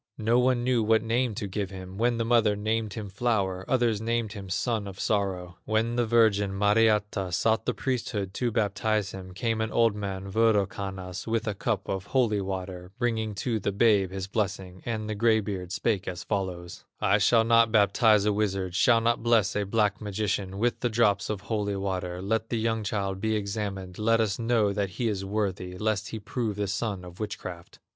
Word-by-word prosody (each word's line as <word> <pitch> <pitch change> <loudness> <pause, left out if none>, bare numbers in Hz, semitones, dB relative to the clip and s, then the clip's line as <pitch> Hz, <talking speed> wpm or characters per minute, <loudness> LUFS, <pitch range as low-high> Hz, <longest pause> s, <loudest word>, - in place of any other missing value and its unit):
No 115 +3 +2
one 125 -1 +2
knew 125 -2 +2
what 110 0 +3
name 115 0 0
to 110 -1 -3
give 100 0 -3
him; 95 -1 -9
When 120 0 +2
the 115 - 0
mother 115 -3 +3
named 110 0 -1
him, 110 -2 -5
Flower, 100 -3 -1
Others 120 -5 +1
named 115 -1 -1
him, 100 -3 -8
Son 105 +3 -1
of 95 -1 -9
Sorrow. 95 -5 -1
When 110 +2 0
the 120 -1 +1
virgin, 105 -4 +3
Mariatta, 105 -2 +2
Sought 110 +6 +1
the - - 0
priesthood 115 -7 -2
to 120 +2 0
baptize 105 -2 0
him, 95 -1 -9
Came 115 0 -1
an 110 - -1
old 115 -3 +3
man, 100 -1 -5
Wirokannas, 100 -3 0
With 115 0 -1
a 105 - 0
cup 100 - -2
of 95 0 -3
holy 115 -6 +2
water, 95 -1 -5
Bringing 110 -4 -1
to 115 -3 0
the 100 - -1
babe 100 -2 +3
his 95 0 -4
blessing; 95 -2 -3
And 110 -2 -2
the 110 - -2
gray 110 +1 +3
beard 95 -4 -5
spake 100 0 -1
as 90 0 -4
follows: 90 -4 -4 0.2
"I 100 +2 +3
shall 115 +3 +4
not 115 0 +4
baptize 105 0 +4
a 105 - +3
wizard, 95 -3 -1
Shall 115 +5 +4
not 115 +1 +1
bless 115 -4 +3
a 105 -1 0
black 105 0 +1
magician 100 -2 -2
With 120 +3 0
the 120 - 0
drops 105 -3 +2
of 105 -3 -3
holy 105 -1 -2
water; 95 -2 -3
Let 110 +2 -1
the 115 - -1
young 115 0 0
child 100 -2 -2
be 110 0 +1
examined, 100 -3 -4
Let 115 +1 +3
us 105 -4 0
know 115 -3 +2
that 100 -1 -1
he 120 - 0
is 100 -3 -2
worthy, 95 -3 -2
Lest 110 0 -1
he 110 - -5
prove 110 +1 -3
the 105 0 -1
son 100 -1 -3
of 90 0 -12
witchcraft." 90 -5 -6
105 Hz, 195 wpm, -27 LUFS, 95-115 Hz, 0.2 s, shall